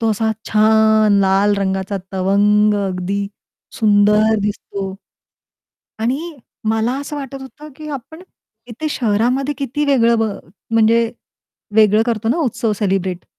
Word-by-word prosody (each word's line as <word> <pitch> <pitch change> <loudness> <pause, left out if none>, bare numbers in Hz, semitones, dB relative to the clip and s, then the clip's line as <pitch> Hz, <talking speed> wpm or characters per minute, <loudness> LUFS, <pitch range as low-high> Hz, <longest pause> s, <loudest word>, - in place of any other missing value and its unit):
तो 225 -1 +1
असा 220 +1 0 0.2
छान 220 0 +4
लाल 195 +1 +3
रंगाचा 190 0 -2 0.2
तवंग 205 +2 +3
अगदी 185 +1 -3 0.6
सुंदर 210 +1 +4
दिसतो. 200 -1 -4 1.1
आणि 245 +5 0 0.5
मला 225 +2 0
असं 285 +1 -6
वाटत 275 -1 -7
होतं, 295 +3 -11
की 305 +1 -9
आपण 315 +7 -14 0.5
इथे 245 +7 -5
शहरामध्ये 250 +4 0
किती 280 +2 -2
वेगळं 235 -5 +3
ब - - +2 0.5
म्हणजे 225 +1 +3 0.6
वेगळं 215 0 +5
करतो 225 -2 -1
ना 245 - +1
उत्सव 225 -2 -1
सेलिब्रेट. 190 -3 -1
220 Hz, 120 wpm, -18 LUFS, 205-240 Hz, 1.1 s, वेगळं